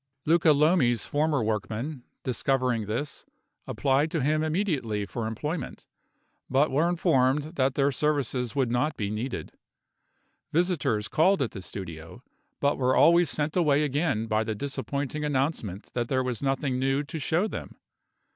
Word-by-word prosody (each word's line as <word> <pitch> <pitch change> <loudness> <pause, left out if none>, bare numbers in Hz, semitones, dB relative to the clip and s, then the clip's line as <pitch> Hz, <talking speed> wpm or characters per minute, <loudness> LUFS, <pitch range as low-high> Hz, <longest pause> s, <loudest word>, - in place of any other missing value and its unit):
Luca 165 0 +5
Lomi's 145 - +3
former 145 -3 +1
workmen, 110 +6 -3 0.2
discovering 125 -3 0
this, 120 +7 -4 0.4
applied 140 +3 +1
to 160 -4 -1
him 155 +2 +2
immediately 155 - -1
for 110 +2 -4
employment; 150 +9 -4 0.6
but 140 +4 +3
were 155 +6 +2
informed 150 -3 +2
that 130 -2 +1
their 140 0 +2
services 135 -4 -1
would 130 -4 +1
not 135 +5 0
be 100 -2 -2
needed. 115 +5 -4 1.0
Visitors 155 - +1
called 185 +4 +3
at 135 -5 -1
the 95 - -7
studio, 85 -4 -8 0.4
but 140 0 +1
were 130 0 +2
always 170 +1 +5
sent 150 +1 -1
away 150 -5 +3
again 145 -5 0
by 110 0 +1
the 110 0 -3
disappointing 140 +3 -3
announcement 135 - -2
that 120 -1 -1
there 130 0 +1
was 125 -3 -3
nothing 135 -1 0
new 135 +2 +1
to 155 +2 -6
show 165 +7 +1
them. - - -7
140 Hz, 145 wpm, -27 LUFS, 120-155 Hz, 1.0 s, Luca